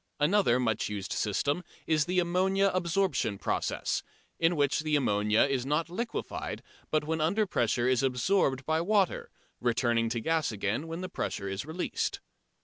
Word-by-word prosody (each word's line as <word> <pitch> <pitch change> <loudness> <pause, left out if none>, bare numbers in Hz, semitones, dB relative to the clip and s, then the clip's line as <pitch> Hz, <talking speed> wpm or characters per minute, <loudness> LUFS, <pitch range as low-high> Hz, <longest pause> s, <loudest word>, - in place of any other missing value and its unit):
Another 150 -5 +3
much 115 -4 0
used 100 -2 -4
system 145 - 0 0.2
is 155 -2 +2
the 180 +1 -1
"ammonia 190 +3 +2
absorption" 175 - 0
process, - - -1 0.4
in 165 +1 +3
which 145 -2 +2
the 155 0 0
ammonia 105 -5 +2
is 135 -3 0
not 150 +5 -1
liquefied, 230 +6 -4 0.3
but 155 -1 +1
when 160 +1 -2
under 200 +8 +2
pressure 120 - +1
is 130 -2 +3
absorbed 135 +1 +1
by 160 +2 +1
water, 195 0 +1 0.3
returning 120 -1 +1
to 115 +1 -1
gas 160 +3 0
again 105 +8 -2
when 165 +2 -5
the 185 - -3
pressure 100 - -3
is 95 +8 -4
released. 170 +3 -2
150 Hz, 155 wpm, -29 LUFS, 120-175 Hz, 0.4 s, Another